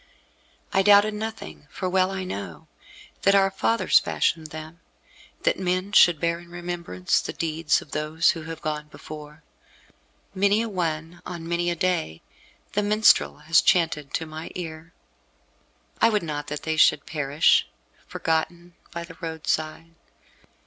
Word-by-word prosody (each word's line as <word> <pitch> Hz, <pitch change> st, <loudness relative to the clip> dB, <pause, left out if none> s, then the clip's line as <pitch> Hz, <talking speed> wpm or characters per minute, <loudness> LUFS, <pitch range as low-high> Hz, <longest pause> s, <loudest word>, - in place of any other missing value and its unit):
I 195 Hz, -, +4 dB
doubted 205 Hz, +1 st, +6 dB
nothing 220 Hz, -7 st, -7 dB
for 185 Hz, -, -4 dB
well 185 Hz, 0 st, +2 dB
I 190 Hz, -1 st, -4 dB
know 95 Hz, -, -7 dB, 0.5 s
that 195 Hz, 0 st, +4 dB
our 195 Hz, -1 st, +4 dB
fathers 200 Hz, 0 st, +3 dB
fashioned 160 Hz, -1 st, -1 dB
them, 155 Hz, +2 st, -9 dB, 0.6 s
that -, -, +1 dB
men 185 Hz, +1 st, -1 dB
should 175 Hz, -6 st, +6 dB
bear 170 Hz, +1 st, 0 dB
in 175 Hz, 0 st, -15 dB
remembrance 175 Hz, -, -2 dB
the -, -, -5 dB
deeds 160 Hz, 0 st, 0 dB
of 150 Hz, -, -22 dB
those 155 Hz, +2 st, +2 dB
who 165 Hz, -, -6 dB
have 165 Hz, 0 st, -8 dB
gone 150 Hz, -1 st, -3 dB
before. 150 Hz, 0 st, -11 dB, 0.9 s
Many 200 Hz, +3 st, +2 dB
a 230 Hz, -, -4 dB
one, 165 Hz, -3 st, -3 dB
on 170 Hz, -2 st, -7 dB
many 170 Hz, +1 st, 0 dB
a 175 Hz, -, -1 dB
day, 160 Hz, -, -1 dB, 0.5 s
the 205 Hz, -, +1 dB
minstrel 210 Hz, -6 st, +3 dB
has 160 Hz, 0 st, +5 dB
chanted 160 Hz, -5 st, +1 dB
to 165 Hz, -, -2 dB
my 155 Hz, +1 st, -8 dB
ear. 165 Hz, -1 st, -7 dB, 1.1 s
I 230 Hz, -, +6 dB
would 210 Hz, -4 st, 0 dB
not 145 Hz, -2 st, -4 dB
that 150 Hz, 0 st, -5 dB
they 160 Hz, 0 st, -2 dB
should 150 Hz, -, +4 dB
perish, 145 Hz, 0 st, +2 dB, 0.4 s
forgotten, 170 Hz, +2 st, -2 dB, 0.2 s
by 170 Hz, 0 st, -6 dB
the 165 Hz, -1 st, -12 dB
roadside. 160 Hz, 0 st, -3 dB
165 Hz, 150 wpm, -25 LUFS, 155-185 Hz, 1.1 s, doubted